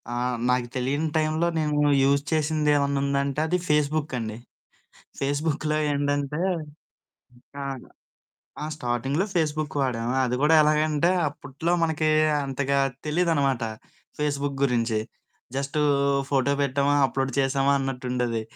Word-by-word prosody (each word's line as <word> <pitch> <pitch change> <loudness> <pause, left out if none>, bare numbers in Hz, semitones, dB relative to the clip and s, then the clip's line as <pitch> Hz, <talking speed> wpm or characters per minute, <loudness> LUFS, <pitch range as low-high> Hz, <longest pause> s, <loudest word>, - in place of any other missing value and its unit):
ఆహ్, 125 0 -1
నాకు 125 -1 +1
తెలియని 140 +5 0
టైమ్‌లో 155 +2 +1
నేను 150 -1 0 0.2
యూజ్ 140 +1 +3
చేసిందేవన్నా 150 -2 +1
ఉందంటే, 140 0 0
అది 180 - +1
ఫేస్‌బుక్ 150 -1 +1
అండి. 110 -2 -4 0.8
ఫేస్‌బుక్‌లో 150 +2 -1 0.2
ఏండంటే 145 +1 -1 1.2
ఆ! - - -3 1.0
ఆ! - - -2
స్టార్టింగ్‌లో 135 - -1
ఫేస్‌బుక్ 155 -2 -1
వాడాము. 120 -2 -1
అది 125 0 -1
గూడా 155 +2 +5
ఎలాగంటే, 155 +1 +2 0.2
అప్పట్లో 145 +3 -4
మనకి 160 -1 0 0.4
అంతగా 140 0 0 0.3
తెలీదనమాట 150 -6 +1 0.6
ఫేస్‌బుక్ 145 -1 -1
గురించి. 115 -4 +1 0.6
జస్టు 140 +2 -2 0.5
ఫోటో 140 0 +2
బెట్టామా, 140 +1 +1
అప్‌లోడ్ 135 +1 -2
చేశామా, 135 +1 +2
అన్నట్టుండేది. 125 -3 -2
140 Hz, 105 wpm, -25 LUFS, 130-150 Hz, 1.2 s, గూడా